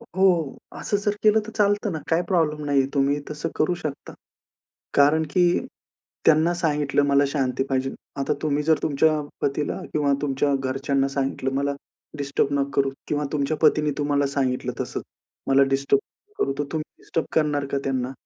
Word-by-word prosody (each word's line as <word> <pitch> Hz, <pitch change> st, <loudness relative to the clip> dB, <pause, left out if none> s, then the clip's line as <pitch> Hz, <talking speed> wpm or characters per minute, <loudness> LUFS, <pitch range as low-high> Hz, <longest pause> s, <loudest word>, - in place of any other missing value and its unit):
हो, 180 Hz, -6 st, +2 dB, 0.2 s
असं 205 Hz, -, 0 dB
जर 205 Hz, 0 st, -1 dB
केलं 215 Hz, +1 st, +5 dB
तर -, -, -7 dB
चालतं 205 Hz, 0 st, +2 dB
ना? 160 Hz, -, -3 dB
काही 165 Hz, +1 st, +3 dB
प्रॉब्लेम 155 Hz, -4 st, +1 dB
नाहीये, 140 Hz, -2 st, +3 dB
तुम्ही 140 Hz, 0 st, +2 dB
तसं 150 Hz, +2 st, -4 dB
करू 165 Hz, +4 st, +2 dB
शकता. 150 Hz, -5 st, -6 dB, 0.8 s
कारण 150 Hz, +3 st, +5 dB
की 180 Hz, -, +4 dB, 0.8 s
त्यांना 160 Hz, +2 st, +5 dB
सांगितलं, 150 Hz, -4 st, +1 dB
मला 140 Hz, 0 st, +4 dB
शांती 135 Hz, -2 st, 0 dB
पाहिजे. 135 Hz, 0 st, 0 dB, 0.3 s
आता 135 Hz, -, +1 dB
तुम्ही 150 Hz, -1 st, 0 dB
जर 160 Hz, 0 st, +3 dB
तुमच्या 155 Hz, +1 st, +2 dB, 0.2 s
पतीला 140 Hz, +1 st, -1 dB
किंवा 145 Hz, -2 st, +2 dB
तुमच्या 140 Hz, 0 st, +1 dB
घरच्यांना 135 Hz, +1 st, 0 dB
सांगितलं, 135 Hz, -1 st, -2 dB
मला 140 Hz, +1 st, 0 dB, 0.4 s
डिस्टर्ब 140 Hz, -1 st, 0 dB
नका 140 Hz, -, 0 dB
करू, 135 Hz, 0 st, -2 dB, 0.2 s
किंवा 150 Hz, 0 st, -1 dB
तुमच्या 150 Hz, +1 st, 0 dB
पतीने 150 Hz, -1 st, +4 dB
तुम्हाला 145 Hz, -1 st, +1 dB
सांगितलं 130 Hz, -2 st, 0 dB
तसंच, -, -, -4 dB, 0.4 s
मला 135 Hz, 0 st, +5 dB
डिस्टर्ब 140 Hz, 0 st, +2 dB, 0.3 s
नका 415 Hz, -, -2 dB
करू. 135 Hz, -, 0 dB
तर -, -, +2 dB
तुम्ही 155 Hz, -1 st, -4 dB
डिस्टर्ब 165 Hz, -, -2 dB
करणार 150 Hz, -2 st, +2 dB
का 140 Hz, -, +1 dB
त्यांना? 130 Hz, -1 st, -1 dB
145 Hz, 165 wpm, -24 LUFS, 140-160 Hz, 0.8 s, केलं